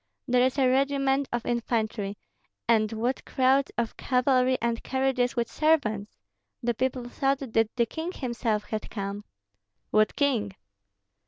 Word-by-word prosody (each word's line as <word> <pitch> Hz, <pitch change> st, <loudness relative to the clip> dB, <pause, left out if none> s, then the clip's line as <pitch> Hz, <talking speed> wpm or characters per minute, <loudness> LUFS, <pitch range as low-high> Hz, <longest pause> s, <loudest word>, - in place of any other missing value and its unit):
There 250 Hz, -1 st, +3 dB
is 260 Hz, +2 st, +1 dB
a 265 Hz, -2 st, +4 dB
regiment 275 Hz, +1 st, +2 dB
of 240 Hz, -1 st, -2 dB
infantry, 220 Hz, -4 st, -1 dB, 0.5 s
and 220 Hz, -2 st, +3 dB
what 235 Hz, +4 st, -1 dB
crowds 265 Hz, +1 st, +2 dB
of 235 Hz, -1 st, -2 dB
cavalry 255 Hz, 0 st, +2 dB
and 235 Hz, 0 st, -1 dB
carriages 265 Hz, -2 st, 0 dB
with 235 Hz, -1 st, 0 dB
servants! 225 Hz, -10 st, +1 dB, 0.5 s
The 240 Hz, 0 st, +1 dB
people 255 Hz, +1 st, -2 dB
thought 270 Hz, +2 st, 0 dB
that 225 Hz, -4 st, 0 dB
the 235 Hz, -2 st, +3 dB
king 320 Hz, +9 st, -5 dB
himself 235 Hz, -, -2 dB
had 215 Hz, 0 st, -5 dB
come." 200 Hz, 0 st, -5 dB, 0.7 s
"What 215 Hz, 0 st, +3 dB
king?" 230 Hz, -9 st, 0 dB
245 Hz, 140 wpm, -27 LUFS, 225-265 Hz, 0.7 s, a